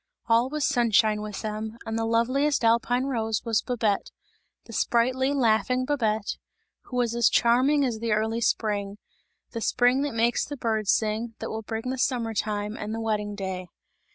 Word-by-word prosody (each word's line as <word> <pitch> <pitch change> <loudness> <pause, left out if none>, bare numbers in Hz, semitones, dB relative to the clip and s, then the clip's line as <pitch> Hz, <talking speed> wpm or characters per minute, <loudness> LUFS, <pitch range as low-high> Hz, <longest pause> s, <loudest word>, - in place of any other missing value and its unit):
All 235 +2 +3
was 300 0 -1
sunshine 220 -3 +3
with 210 0 -6
them, 215 +1 -4
and 225 - -3
the 225 0 -1
loveliest 255 +4 +1
alpine 235 +2 +2
rose 225 -5 -1
was 225 -2 +1
Babette, 225 -5 -1 0.6
the 230 - -11
sprightly, 255 +4 +1
laughing 250 -1 +2
Babette, 220 -7 -1 0.5
who 250 - -6
was 240 -2 +1
as 235 -1 +4
charming 265 +5 +3
as 235 -4 -2
the 230 0 -2
early 220 +2 0
spring; 205 -1 -1 0.5
the 230 - -5
spring 245 +4 +3
that 285 -4 -2
makes 235 +1 +2
the 290 - -6
birds 220 -4 0
sing, 220 +1 -1
that - - -5
will 220 - -4
bring 225 +3 -4
the 260 - -4
summer 235 -4 0
time 210 0 -2
and 215 0 -4
the - - -4
wedding 210 -2 -2
day. 190 -2 -5
230 Hz, 175 wpm, -26 LUFS, 215-245 Hz, 0.6 s, as